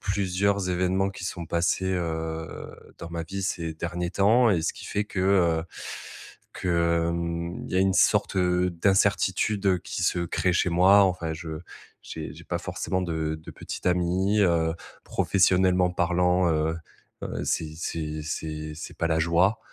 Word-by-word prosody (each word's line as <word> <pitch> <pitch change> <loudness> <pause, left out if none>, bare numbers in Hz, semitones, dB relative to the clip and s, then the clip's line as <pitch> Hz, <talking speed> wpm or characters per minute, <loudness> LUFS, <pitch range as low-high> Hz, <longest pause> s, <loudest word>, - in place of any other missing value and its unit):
plusieurs 100 0 0
événements 95 +2 +1
qui 95 - -8
sont 90 -2 -4
passés, 85 +3 0
heu, 80 -2 -4 0.2
dans 85 - -8
ma 85 0 -3
vie 95 +4 -5
ces 85 -3 -2
derniers 85 +2 -3
temps 115 +5 +4
et 85 -5 +1
ce 80 - 0
qui - - -11
fait 105 - -1
que, 100 -2 -4
heu, 85 -4 +3 0.9
que, - - -4 0.4
hem, 85 0 -3
il - - -9
y - - +1
a - - +4
une 95 0 +2
sorte - - +3
d'incertitude, 95 +3 +1
heu, 95 -2 +3
qui 90 - -5
se 90 - +1
crée 90 +1 0
chez 90 - +2
moi, 95 +4 +6
enfin, 90 -4 -1
je 80 -1 -6 0.4
j'ai - - -7
j'ai - - -13
pas - - -2
forcément 95 - -3
de 80 -3 -2
de 80 - -11
petite - - -7
amie, 90 +3 +2
heu, 80 -2 +2 0.3
professionnellement 90 -1 +3
parlant, 90 0 +2
heu, 80 +1 0 0.5
heu, - - -4
c'est 80 -1 -2
c'est 80 -2 -4
c'est 75 0 -5
c'est - - -8
pas 85 - +1
la 80 -1 +1
joie. 85 +6 +3
90 Hz, 165 wpm, -26 LUFS, 80-95 Hz, 0.9 s, moi